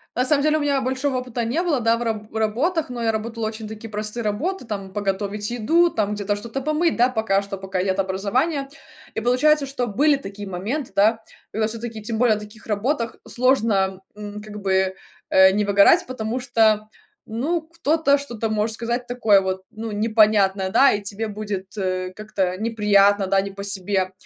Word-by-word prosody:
На 250 - +1
самом 280 +1 +4
деле 310 0 +3
у - - -1
меня 285 -2 +1
большого 260 +1 -1
опыта 250 -2 -3
не 265 +10 0
было, 310 -7 +1
да, 230 +1 +3
в 240 - -3
раб 215 -2 -4
работах, 250 - 0
но 240 -1 -5
я 225 - +2
работала 220 +1 -3
очень 220 0 -6
такие 220 +1 -8
простые 215 +2 -3
работы: 300 - -2
там 195 -3 -6
подготовить 205 +1 -2
еду, 320 +10 +3
там 210 -6 -1
где-то 205 0 -1
что-то 235 +6 -5
помыть, 305 +4 +1
да, 245 +2 +4
пока 220 -5 +1
что, 200 0 -6
пока 190 -1 -3
нет 190 0 0
образования. 245 - 0 0.5
И, - - -1
получается, 280 +5 +3
что 255 -3 -3
были 285 +8 +3
такие 205 -5 -8
моменты, 215 +10 -4
да, 220 +3 +3 0.3
когда 220 0 0
всё-таки, 225 -1 -5
тем 220 0 -3
более 235 -3 +4
на 210 - -6
таких 210 +1 -13
работах 230 +3 -1
сложно, 220 -7 +1
м, 210 0 -7
как 210 -1 -9
бы, 190 -1 +1 0.4
э, 190 0 +7
не 210 +1 0
выгорать, 200 - +5
потому 245 -1 -3
что, 220 -4 +2 0.4
ну, 290 +10 -1
кто-то 320 -2 +1
что-то 235 -6 -4
может 215 +1 0
сказать 240 +2 -3
такое 225 -5 +4
вот, 190 0 -2
ну, 220 +1 -6
непонятное, 210 -3 +3
да, 270 +8 +5
и 205 - -1
тебе 210 +2 -4
будет, 200 -2 -5
э, 185 -1 -2
как-то 190 -4 -2
неприятно, 205 -2 +3
да, 195 +1 +3
не 195 +1 -2
по 200 0 -8
себе. 195 -1 0
220 Hz, 190 wpm, -22 LUFS, 200-250 Hz, 0.5 s, э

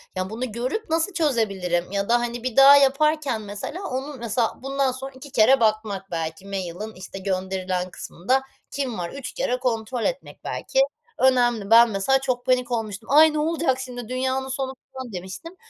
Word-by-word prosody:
ya, 185 +1 -2
bunu 235 +1 -4
görüp 255 - -3
nasıl 330 +4 0
çözebilirim 195 - 0
ya 200 +2 -2
da, 240 0 +4
hani, 240 0 -4
bir 255 -3 -3
daha 275 +1 +9
yaparken, 280 -3 +2
mesela, 210 - -6
onun, 265 +1 -4
mesela, 235 0 -1
bundan 275 -1 0
sonra 265 +2 -7
2 265 +1 -12
kere 245 +2 +5
bakmak 215 -3 0
belki 165 +2 -4
mail'in, 195 +2 -5
işte, 190 +1 -9
gönderilen 185 -1 -2
kısmında 250 +8 -1 0.3
kim 265 -5 -3
var 175 -1 -3
3 275 -2 -7
kere 250 +1 -1
kontrol 240 -1 -2
etmek - - -4
belki - - -2 0.4
önemli. 240 -5 +3
Ben 235 +1 +8
mesela, 220 +7 +2
çok 250 -2 -2
panik 250 -1 +1
olmuştum, 220 -2 -3
"Ay, 310 +2 +7
ne 305 - 0
olacak 310 -4 +1
şimdi, 245 -3 -7
dünyanın 260 +1 -1
sonu." 265 0 -3 0.2
falan 260 -5 -7
demiştim. 190 - -7
245 Hz, 170 wpm, -24 LUFS, 200-270 Hz, 0.4 s, daha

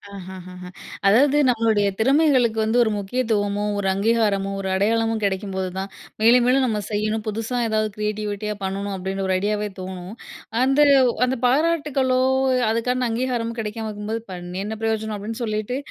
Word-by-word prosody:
ஆஹா! 190 -1 -8
ஹா! 185 - -10
ஹா! 180 - -8 0.4
அதாவது 275 +8 +5
நம்மளுடைய 220 -4 +2
திறமைகளுக்கு 260 -3 +3
வந்து 220 +2 +1
ஒரு 220 - 0
முக்கியத்துவமோ! 205 -1 -1
ஒரு 200 -1 -1
அங்கீகாரமோ! 200 -1 +1
ஒரு 190 - -4
அடையாளமும் 225 +2 +1
கிடைக்கும்போது 190 -1 -2
தான் 195 +1 -3 0.3
மேலும், 240 +2 +6
மேலும் 260 +1 +3
நம்ம 220 -4 -1
செய்யணும். 215 +1 -1
புதுசா 225 +3 -3
ஏதாவது 215 0 0
கிரியேட்டிவிட்டியா 210 0 -3
பண்ணணும். 195 +1 -3
அப்பிடின்ற 190 +1 -3
ஒரு 185 - +1
ஐடியாவே 210 +1 -1
தோணும். 185 +2 -7 0.5
அந்த, 270 +3 +3 0.4
அந்த 255 0 -1
பாராட்டுக்களோ! 275 -2 +2 0.5
அதுக்கான 250 +2 0
அங்கீகாரமோ 235 -1 -2
கிடைக்காம 220 0 -4
இருக்கும்போது, 215 +2 -4
"பண்ணி 180 +1 -6
என்ன 220 +1 -4
பிரயோஜனம்?" 220 -1 -1
அப்பிடின்னு 225 +4 -5
சொல்லிட்டு, 215 +3 -2
215 Hz, 145 wpm, -22 LUFS, 200-240 Hz, 0.5 s, மேலும்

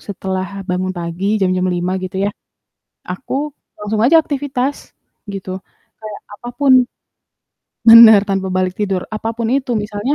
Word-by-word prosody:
setelah 190 -1 -4 0.2
bangun 185 +1 -1
pagi 175 +5 -2
jam-jam 185 -1 +1
05:00 175 +1 -2
gitu 185 0 -6
yah, 205 - -1 0.7
aku 185 +9 -6 0.4
langsung 210 +1 -3
aja 305 +7 +5
aktivitas 280 -1 -4 0.4
gitu, 195 -1 -7 0.5
kayak 215 -1 -8 0.2
apapun 260 +3 0 1.2
bener 225 -2 +10
tanpa 195 -1 -1
balik 185 -1 0
tidur, 195 -3 -1
apapun 225 +1 -3
itu 270 -2 -2
misalnya, 210 +5 -2
205 Hz, 125 wpm, -17 LUFS, 185-230 Hz, 1.2 s, bener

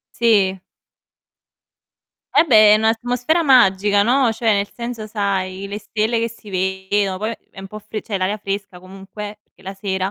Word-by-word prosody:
Sì. 200 -5 +2 1.7
Vabbè, 215 -9 +6
è - - +5
n'atmosfera 245 +8 0
magica 205 -7 +4
no, 245 +2 +2
cioè 225 -1 +1
nel 200 0 -1
senso, 235 -2 -6
sai, 195 -2 -3
le 205 +1 -5
stelle 220 +2 -1
che 230 0 -1
si 220 -2 -15
vedono, 190 +1 -1
poi 220 +3 -3
è - - -12
un 195 - -8
po' 215 +2 -9
fre 215 +1 -7
c'è 205 -2 -4
l'aria 190 +3 -1
fresca 200 -2 -5
comunque, 195 +3 -9
perché - - -29
la 195 +1 -7
sera. 190 -1 -3
205 Hz, 160 wpm, -19 LUFS, 195-225 Hz, 1.7 s, Vabbè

